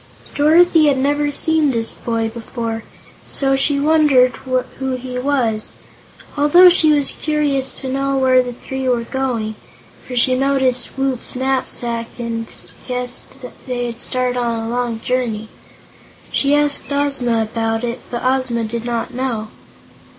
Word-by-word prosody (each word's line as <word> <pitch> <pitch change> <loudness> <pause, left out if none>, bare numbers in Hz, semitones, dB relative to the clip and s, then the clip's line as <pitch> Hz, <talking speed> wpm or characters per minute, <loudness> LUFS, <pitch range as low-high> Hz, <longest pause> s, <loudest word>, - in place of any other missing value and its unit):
Dorothy 320 +1 +5
had 280 -2 +3
never 290 +2 +1
seen 315 0 +1
this 230 -3 -1
boy 230 -1 -2
before, 225 0 -5 0.5
so 270 -1 +3
she 280 +1 +1
wondered 290 -4 +4
who 260 +1 -3
he 250 0 -5
was. 250 -5 -1 0.6
Also 325 +5 +7
she 320 -3 +4
was 290 -2 +2
curious 290 -3 0
to 265 - -5
know 275 +1 0
where 260 -1 +4
the 250 -1 -4
three 265 +2 -4
were 240 -2 +1
going, 235 -4 -2 0.5
for 250 - -7
she 255 +1 +3
noticed 265 -2 0
Woot's 270 -3 -1
knapsack 250 -3 -1
and 230 -1 -4 0.4
guessed 250 -1 -4 0.4
they 245 -1 -2
had 235 0 -5
started 250 -1 -1
on 235 -1 -1
a 225 - -4
long 240 -1 -2
journey. 230 -4 -2 0.8
She 280 +1 +2
asked 295 -1 0
Ozma 275 -5 +1
about 225 +1 -2
it, 240 0 -3
but 240 - -4
Ozma 255 -3 +1
did 225 +1 -4
not 240 +1 -3
know. 240 -4 -3
255 Hz, 145 wpm, -18 LUFS, 235-275 Hz, 0.8 s, Also